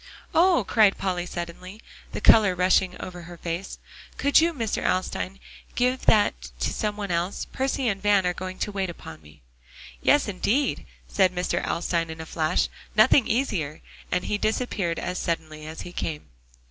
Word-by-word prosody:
"Oh!" 345 - +4
cried 215 -3 +4
Polly 180 -2 -2
suddenly, 180 +4 -7 0.3
the - - -5
color 200 -5 +6
rushing 185 0 +2
over 180 -1 -7
her 175 0 -11
face. 170 +3 -5 0.4
"Could 285 +2 +5
you, 335 +1 +3
Mr. 230 -9 -2
Alstyne, 185 +1 -1 0.4
give 250 +1 0
that 65 - +3
to - - 0
some 210 -1 -2
one 200 -3 -4
else? 170 +3 -1
Percy 265 -1 -1
and 195 -3 -1
Van 205 -2 +3
are 180 - +1
going 185 +1 -6
to 210 - -2
wait 195 -2 -2
upon 80 - -10
me." 75 -3 -18 0.6
"Yes, 290 - +4
indeed," 210 +8 0 0.2
said 190 -2 +3
Mr. 180 -1 -1
Alstyne 170 -1 -1
in 160 0 -7
a 160 - -6
flash, 155 -1 0 0.3
"nothing 220 +3 +5
easier;" 185 - -1 0.3
and 180 0 0
he 205 - -1
disappeared 215 -6 -1
as 180 - -3
suddenly 155 -2 -3
as 160 +1 -7
he 175 - -8
came. 155 - -4
185 Hz, 170 wpm, -25 LUFS, 170-215 Hz, 0.6 s, color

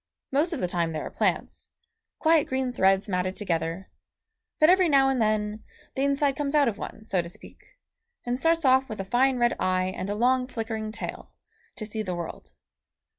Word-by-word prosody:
Most 295 +6 +1
of 325 - -3
the 180 - 0
time 170 -2 -1
they 155 - -2
are - - -6
plants, - - -2 0.5
quiet 320 -2 +3
green 260 -1 -1
threads 195 0 +3
matted 185 -1 -1
together, 170 -1 -3 0.7
but 310 - +6
every 365 0 +5
now 270 -2 +5
and 260 -3 0
then 215 0 0 0.3
the 270 - -1
inside 280 0 +1
comes 290 +1 -2
out 290 -3 +5
of 220 -3 -2
one, 220 - -8
so 190 -4 +1
to 170 - -8
speak, 180 - -15 0.5
and 245 +1 -1
starts 330 +1 +2
off 265 0 +4
with 215 - -6
a 195 - -3
fine 255 +5 +2
red 240 0 +2
eye 185 0 0
and 190 - -4
a 205 - -1
long 250 +3 +2
flickering 225 -3 -4
tail, - - -7 0.4
to 215 - -6
see 215 +1 -4
the 185 -4 -3
world. 170 -1 -7
225 Hz, 195 wpm, -26 LUFS, 190-270 Hz, 0.7 s, but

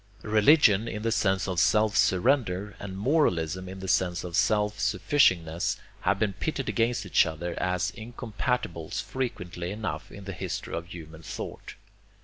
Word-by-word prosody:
Religion 110 0 +5
in 105 -1 -4
the 115 - +1
sense 95 -3 +1
of 90 -3 -1
self 105 +4 +3
surrender, 105 -2 +2
and 95 -1 -6
moralism 95 - +1
in 95 0 -8
the 95 - -5
sense 90 -2 +1
of 90 -2 -5
self 105 +1 +2
sufficingness, 90 - +2 0.2
have 95 +2 +1
been 105 -1 0
pitted 135 +4 -3
against 115 -1 0
each 90 - +4
other 85 +2 -4
as 90 0 0
incompatibles 115 -5 -3
frequently 90 -8 -4
enough 95 -7 -5
in 100 - -10
the 95 0 -6
history 90 0 -5
of 85 0 -4
human 80 -3 -10
thought. - - -7
95 Hz, 150 wpm, -27 LUFS, 90-110 Hz, 0.2 s, Religion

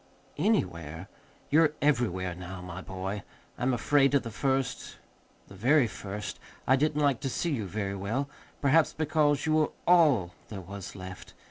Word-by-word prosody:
"Anywhere? 85 - -1 0.4
You're 155 0 +5
everywhere 110 -11 +1
now, 90 +1 -8
my 90 +1 -7
boy. 95 +2 -4 0.3
I'm 125 +1 0
afraid, 140 +3 +3
at 140 - +3
the 115 - -6
first, 135 +1 -1 0.5
the - - -13
very 130 +8 +4
first, 100 0 -6 0.3
I 130 - +5
didn't 150 +2 +1
like 140 -5 +3
to 135 - -2
see 170 +6 -1
you 110 -9 -2
very 100 0 -3
well, 110 +9 -2 0.4
perhaps 150 +3 +4
because 150 -2 +1
you 155 - +2
were 155 -1 +3 0.2
ALL 145 - +4 0.2
there 105 - -6
was 100 +1 -8
left. 95 -1 -9
120 Hz, 155 wpm, -29 LUFS, 95-145 Hz, 0.5 s, You're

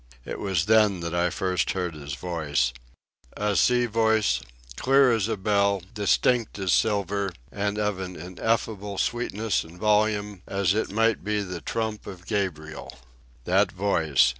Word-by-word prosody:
It - - -5
was 95 -5 0
then 105 -4 +4
that 85 0 -4
I 85 0 +2
first 90 +1 -1
heard 90 -3 -2
his 70 -2 -6
voice—a 70 +3 -3
sea 125 +3 +4
voice, 110 -1 +2 0.3
clear 135 - +4
as 110 -3 +1
a 110 -2 -1
bell, 100 -1 +1
distinct 115 +2 +1
as 95 -3 +1
silver, 100 -2 +1 0.2
and 100 +2 -2
of 105 -2 -1
an 90 -1 -5
ineffable 100 +3 -2
sweetness 115 -2 -1
and 80 +2 -14
volume, 105 -2 +1
as 100 -2 +1
it 110 -1 -1
might 115 0 +2
be 105 +1 0
the 90 -3 -5
trump 110 +1 -3
of 95 -2 -9
Gabriel. 80 - -3 0.5
That 95 +5 +2
voice! 80 -10 +2
100 Hz, 145 wpm, -26 LUFS, 90-105 Hz, 0.5 s, then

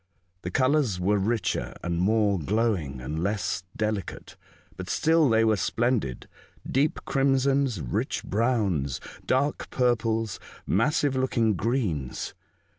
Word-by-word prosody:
The 90 - -4
colours 130 -3 +2
were 100 +3 +2
richer 110 +3 -1
and 85 0 -1
more 105 0 +2
glowing, 95 - 0
and 75 +5 -4
less 100 -1 -1 0.2
delicate. 105 -4 -3 0.4
But 95 0 -7
still 160 -2 +3
they 115 0 +4
were 110 -1 +3
splendid 115 - -1 0.2
— - - -31
deep 150 +5 0
crimsons, 135 - +2
rich - - -2
browns, 100 - 0 0.3
dark 140 +3 0
purples, 115 -4 0 0.3
massive 140 - +1
looking 120 -4 +2
greens. 95 - -2
110 Hz, 115 wpm, -26 LUFS, 95-130 Hz, 0.4 s, they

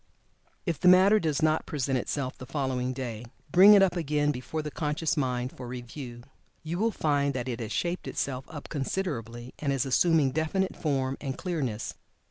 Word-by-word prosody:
If 170 -5 -1
the 180 - +2
matter 190 +4 +7
does 155 -5 -1
not 155 0 +2
present 140 -3 -1
itself 130 +1 -3
the 130 - -10
following 130 -3 -1
day, 120 -4 -5 0.3
bring 200 +6 +9
it 195 - +7
up 185 -2 +2
again 150 -3 +1
before 145 +4 -4
the 150 - -5
conscious 150 +1 -1
mind 125 -3 -1
for 125 - -8
review. 120 0 -8 0.4
You 165 +3 -3
will 225 +2 +3
find 145 -8 0
that 125 -1 -3
it 120 -2 -3
has 115 -2 -5
shaped 175 +7 -2
itself 130 -1 -3
up 150 -3 -8
considerably, 125 - -4
and 145 -2 -1
is 135 -2 0
assuming 150 +1 +3
definite 160 +6 -1
form 135 -4 -1
and 135 -2 -4
clearness. 140 - -3
140 Hz, 180 wpm, -28 LUFS, 130-160 Hz, 0.4 s, bring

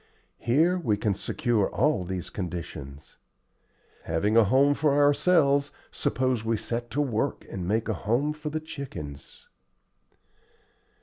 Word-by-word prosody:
Here 160 +10 +2
we 110 -11 0
can 105 -1 0
secure 110 +1 0
all 150 -11 +1
these 90 0 -5
conditions. 80 -6 -7 0.9
Having 90 +7 0
a 115 -1 +6
home 135 +6 +4
for 145 -1 +1
ourselves, 145 -1 +4 0.2
suppose 130 -3 0
we 115 0 0
set 120 +2 -4
to 145 +5 0
work 130 -1 -1
to - - -9
make 105 +5 -1
a 110 - 0
home 120 +10 0
for 155 0 -6
the 155 +1 -2
chickens." 125 - -8
120 Hz, 130 wpm, -27 LUFS, 100-145 Hz, 0.9 s, a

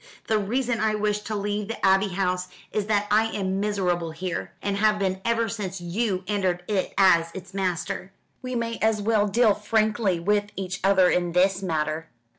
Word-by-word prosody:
The 220 -1 +2
reason 240 +3 -1
I 215 0 +1
wish 210 0 0
to 215 +1 -5
leave 205 0 -2
the 225 -2 -3
Abbey 195 +1 +4
House 185 -1 -1 0.2
is 210 -1 -1
that 210 -1 +2
I 215 +1 +4
am 195 -3 -2
miserable 185 -5 0
here, 175 +3 -4
and 200 -1 -2
have 210 0 +3
been 190 -2 -1
ever 230 0 +1
since 195 -3 -4
you 190 +2 -1
entered 185 -3 -1
it 200 -3 -1
as 170 -4 +5
its 190 0 -9
master. 190 0 -2 0.3
We 255 -1 -4
may 230 -1 -2
as 220 0 +2
well 210 0 +2
deal 220 +1 +4
frankly 210 -3 +1
with 205 +3 +1
each 185 -1 -4
other 190 -1 +5
in 175 -1 +1
this 190 +2 +3
matter. 160 -2 -2
200 Hz, 185 wpm, -25 LUFS, 185-215 Hz, 0.3 s, as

